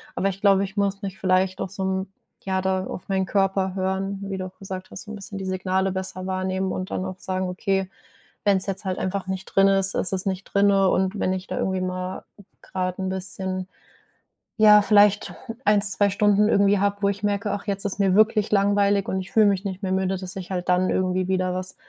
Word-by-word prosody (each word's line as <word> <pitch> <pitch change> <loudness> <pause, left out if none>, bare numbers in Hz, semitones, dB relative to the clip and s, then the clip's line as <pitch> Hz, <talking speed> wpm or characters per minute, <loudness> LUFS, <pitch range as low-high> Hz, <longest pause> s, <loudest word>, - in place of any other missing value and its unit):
Aber 195 - 0
ich 195 0 -7
glaube, 195 -1 +4
ich 195 0 -11
muss 200 0 0
mich 190 -1 -5
vielleicht 185 0 +1
auch 190 - -3
so 195 +1 -5
'n 190 0 -2 0.3
ja, 190 -1 -1
da 190 0 0
auf 180 - -8
meinen 190 -1 +1
Körper 195 -1 0
hören, 190 +1 -2
wie 195 -1 -4
du 185 - -4
auch 185 0 -11
gesagt 190 -1 -7
hast, - - -7
so 215 - -10
'n - - -6
bisschen 200 0 -7
die 190 - -5
Signale 190 0 0
besser 185 0 -4
wahrnehmen 190 0 -1
und 185 0 -5
dann 185 - -2
auch 185 0 -6
sagen: 185 0 -2
„Okay, 190 +1 -1 0.6
wenn 200 -1 +4
es 190 - -1
jetzt 195 +1 -4
halt 185 -1 -2
einfach 190 0 -3
nicht 190 0 -4
drin 195 0 +3
ist, 195 0 +2
ist 180 - 0
es 190 -1 -1
nicht 190 0 -2
drinne.” 200 -1 +3
Und 190 +3 0
wenn 185 - +1
ich 185 0 -5
da - - -4
irgendwie 190 -1 -1
mal 185 0 -4 0.4
grade 185 0 -3
'n - - -1
bisschen, 190 0 -3 0.9
ja, 210 -1 +8
vielleicht 205 0 +4 0.3
1, 210 -1 +4
2 205 0 +4
Stunden 205 +1 +3
irgendwie 200 -1 +3
habe, 200 +1 +1
wo 200 - +4
ich 200 0 -4
merke: 205 0 0
„Ach, 200 - -5
jetzt 200 -1 -1
ist 200 0 -2
mir 195 -2 +3
wirklich 215 0 +3
langweilig 200 -1 +2
und 190 - -1
ich 185 - -11
fühle 220 -1 +5
mich 200 0 0
nicht 190 0 -5
mehr 190 - -1
müde.“, 190 0 0
dass 185 0 -7
ich 185 -2 -7
halt 180 -1 -3
dann 180 +1 +3
irgendwie 185 0 0
wieder 185 -1 0
was 185 0 -3
190 Hz, 230 wpm, -24 LUFS, 185-200 Hz, 0.9 s, ja